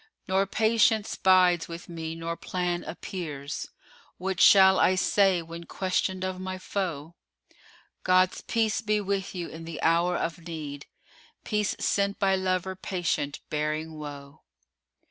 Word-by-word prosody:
Nor 190 +1 +2
Patience 220 0 +2
bides 180 -2 +4
with 170 +1 -8
me 165 -1 -5
nor 165 0 -4
plan 175 0 -2
appears: 155 -5 -6 0.2
* - - -28
What 185 0 -2
shall 190 -1 +7
I 185 - +4
say 190 -2 +3
when 170 +1 -9
questioned 185 +1 -1
of 185 0 -4
my 185 0 -4
foe? 170 -5 -4 0.9
God's 185 0 +3
peace 225 0 0
be 215 -1 +1
with 195 -1 -2
you 175 -2 -3
in 165 +1 -9
the 165 -1 -7
hour 170 +2 +3
of 165 0 -4
need, 150 -4 -6 0.3
* - - -28
Peace 210 -2 0
sent 200 0 0
by 195 -1 +2
lover 185 0 -1
patient 175 -6 -2
bearing 155 +1 -2
woe!" 145 -2 -9
180 Hz, 145 wpm, -27 LUFS, 165-190 Hz, 0.9 s, shall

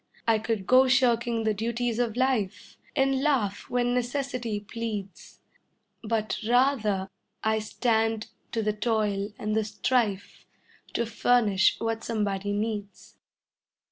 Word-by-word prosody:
I 225 -1 +4
could 220 -3 -2
go 255 +4 +6
shirking 240 -3 +2
the 220 -1 +2
duties 235 +2 -2
of 235 -2 0
life 255 -7 -1 0.2
And 270 0 +2
laugh 250 -9 0
when 245 0 +1
necessity 245 -3 -2
pleads, 210 -2 -6 0.6
But 220 -1 -1
rather 235 -7 +2 0.4
I 220 0 +2
stand 225 0 0 0.3
to 225 -1 0
the 210 0 +1
toil 210 -2 0
and 215 0 -2
the 220 - +2
strife 215 -1 -1 0.5
To 235 - +1
furnish 225 -3 +3
what 225 0 -2
somebody 205 -3 -1
needs. 205 -1 -4
225 Hz, 120 wpm, -27 LUFS, 210-245 Hz, 0.6 s, go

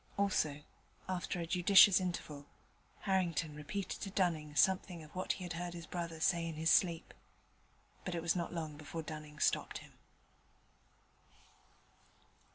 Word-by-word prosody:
Also, 155 -7 +1 0.4
after 185 0 -2
a 170 - -2
judicious 190 +2 +7
interval, 155 -6 -4 0.5
Harrington 175 -5 0
repeated 150 +7 -5
to 195 - -3
Dunning 165 -6 0
something 185 -1 +2
of 155 - -15
what 185 - -1
he 185 - -8
had 175 -1 -4
heard 175 +1 -4
his 170 -1 -7
brother 170 -1 -5
say 170 0 +2
in 165 - -5
his 160 +1 +2
sleep: 170 -2 +2 0.9
but 180 - -3
it 170 - -2
was 170 +1 +2
not 170 -2 -2
long 155 -3 -4
before 155 +2 -6
Dunning 150 -1 -8
stopped - - +1
him. - - -13
170 Hz, 145 wpm, -35 LUFS, 155-185 Hz, 0.9 s, judicious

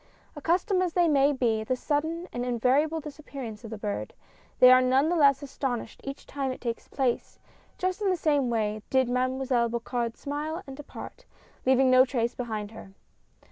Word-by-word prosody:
Accustomed 355 +5 +1
as 360 -3 0
they 350 -1 +3
may 285 -2 +4
be 235 -5 +1
at 220 - -8
the 255 - +1
sudden 315 +6 -2
and 245 - -2
invari 250 +3 +2
able 315 +1 -2
disappearance 275 -7 -8
of 225 - -8
the 220 - -6
bird, 205 -1 -4 0.4
they 250 0 +9
are 255 0 +7
none 260 +4 +3
the 350 - +1
less 280 -3 +4
astonished 260 -4 -4
each 275 +1 -7
time 275 -2 -3
it 255 - -7
takes 235 -2 -4
place 260 -3 -2 0.2
— - - -33
just 370 +2 -2
in 400 - +2
the 365 - +1
same 290 -6 +1
way 215 -2 -1
did 260 -1 +3
Mademoiselle 255 -1 +1
Bocard 235 0 -3
smile 300 +3 -4
and 270 - -9
depart, 300 - -10 0.4
leaving 260 0 +5
no 255 0 +8
trace 240 -3 -1
behind 220 -4 -4
her. 220 -3 -12
265 Hz, 190 wpm, -27 LUFS, 240-295 Hz, 0.4 s, they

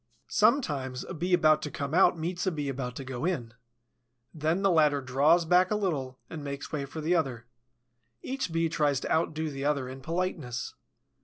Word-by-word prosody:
Sometimes 135 - +2
a - - -7
Bee 175 +3 -3
about 155 -3 +5
to 150 - -4
come 140 0 -4
out 175 0 +5
meets 175 +3 -3
a - - +3
Bee 145 -4 -3
about 125 -2 -4
to 135 - -5
go 130 -1 -5
in. 135 -11 -2 0.8
Then 160 +4 0
the 195 - +4
latter 150 -4 +4
draws 140 +6 +3
back 180 +2 +4
a 215 - +1
little 145 -11 -2
and 155 -2 -7
makes 140 0 -6
way 145 -3 -2
for 155 +3 -7
the 160 +3 +1
other. 130 -9 -1 0.8
Each 260 -7 -3
Bee 165 0 +1
tries 145 -4 +1
to - - -4
outdo 160 -1 0
the 135 -1 -5
other 140 -3 0
in 130 +1 -8
politeness. 160 -6 -3
155 Hz, 190 wpm, -29 LUFS, 135-170 Hz, 0.8 s, about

